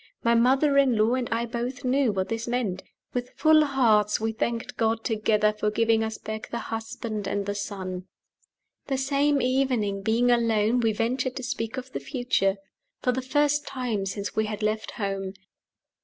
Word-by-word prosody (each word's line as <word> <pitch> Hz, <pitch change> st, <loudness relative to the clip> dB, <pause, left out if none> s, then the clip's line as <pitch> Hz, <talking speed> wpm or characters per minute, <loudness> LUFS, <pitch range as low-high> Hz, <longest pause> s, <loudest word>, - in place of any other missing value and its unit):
My 235 Hz, -, +4 dB
mother 270 Hz, +4 st, +4 dB
in 260 Hz, -5 st, +3 dB
law 215 Hz, +3 st, +3 dB
and 255 Hz, -2 st, -1 dB
I 230 Hz, +1 st, 0 dB
both 245 Hz, +2 st, -4 dB
knew 260 Hz, -1 st, +3 dB
what 190 Hz, -1 st, -2 dB
this 225 Hz, +1 st, -3 dB
meant. 230 Hz, -7 st, -1 dB, 0.3 s
With 245 Hz, 0 st, -4 dB
full 310 Hz, -1 st, +5 dB
hearts 225 Hz, -7 st, +3 dB
we 220 Hz, +1 st, -1 dB
thanked 235 Hz, +2 st, -3 dB
God 225 Hz, -1 st, 0 dB
together 215 Hz, -2 st, +2 dB
for 210 Hz, 0 st, -1 dB
giving 225 Hz, +1 st, +2 dB
us 220 Hz, 0 st, -3 dB
back 220 Hz, 0 st, -6 dB
the 235 Hz, -, -3 dB
husband 225 Hz, -2 st, -4 dB
and 200 Hz, -1 st, -1 dB
the 200 Hz, -, -2 dB
son. 185 Hz, -2 st, -5 dB, 0.8 s
The 270 Hz, -, 0 dB
same 280 Hz, +1 st, +2 dB
evening, 250 Hz, -6 st, +1 dB
being 230 Hz, +4 st, +2 dB
alone, 230 Hz, 0 st, +2 dB
we 225 Hz, -2 st, +2 dB
ventured 250 Hz, +4 st, -1 dB
to 260 Hz, -, -5 dB
speak 245 Hz, -1 st, -3 dB
of 255 Hz, 0 st, -6 dB
the -, -, -3 dB
future 245 Hz, -7 st, 0 dB, 0.5 s
for 250 Hz, -, +3 dB
the 255 Hz, +1 st, -2 dB
first 290 Hz, +2 st, +1 dB
time 235 Hz, -7 st, -2 dB
since 200 Hz, +1 st, -4 dB
we 220 Hz, -, +2 dB
had 210 Hz, 0 st, -4 dB
left 215 Hz, +1 st, -1 dB
home. 195 Hz, -3 st, -3 dB
230 Hz, 180 wpm, -26 LUFS, 215-255 Hz, 0.8 s, full